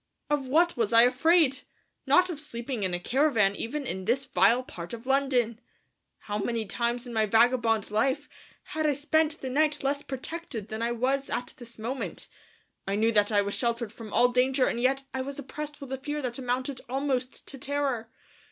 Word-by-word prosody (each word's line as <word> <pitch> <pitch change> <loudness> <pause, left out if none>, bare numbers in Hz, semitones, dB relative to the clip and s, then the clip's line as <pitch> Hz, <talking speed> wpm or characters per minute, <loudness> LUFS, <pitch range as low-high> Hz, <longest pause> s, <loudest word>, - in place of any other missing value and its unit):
Of 285 -3 +1
what 335 +6 +3
was 230 -2 0
I 230 0 +8
afraid? 275 +2 +4 0.5
Not 360 0 +5
of 310 - -6
sleeping 240 -4 -5
in 190 -2 +1
a - - -3
caravan 230 -3 +2
even 280 +7 -4
in 190 -4 -4
this 265 +5 +1
vile 245 +2 +3
part 175 -6 -8
of 230 +1 -13
London! 255 -4 +1 0.6
How 205 0 -3
many 230 +1 -1
times 235 +4 -2
in 240 - -7
my 220 -1 +2
vagabond 225 -1 +3
life 265 +7 +1 0.5
had 315 0 +1
I 295 - +3
spent 310 +2 +1
the 260 - -3
night 300 +1 +1
less 280 +1 0
protected 265 - -6
than 220 +1 -4
I 235 +1 0
was 265 +3 0
at 245 - -3
this 235 -2 -11
moment! 240 +5 -5 0.6
I 195 - 0
knew 220 +2 +3
that 210 -1 +3
I 205 -1 +3
was 200 0 -3
sheltered 235 -2 -1
from 225 -2 -9
all 245 +2 +4
danger 255 +1 +2
and 235 - -1
yet 270 +2 +2
I 265 - -1
was 275 +1 -5
oppressed 295 +1 -6
with 275 -2 -7
a - - -2
fear 295 +2 -3
that 245 0 -3
amounted 255 +1 -2
almost 265 -1 -2
to 275 - -7
terror. 275 -5 -1
255 Hz, 195 wpm, -28 LUFS, 230-280 Hz, 0.6 s, I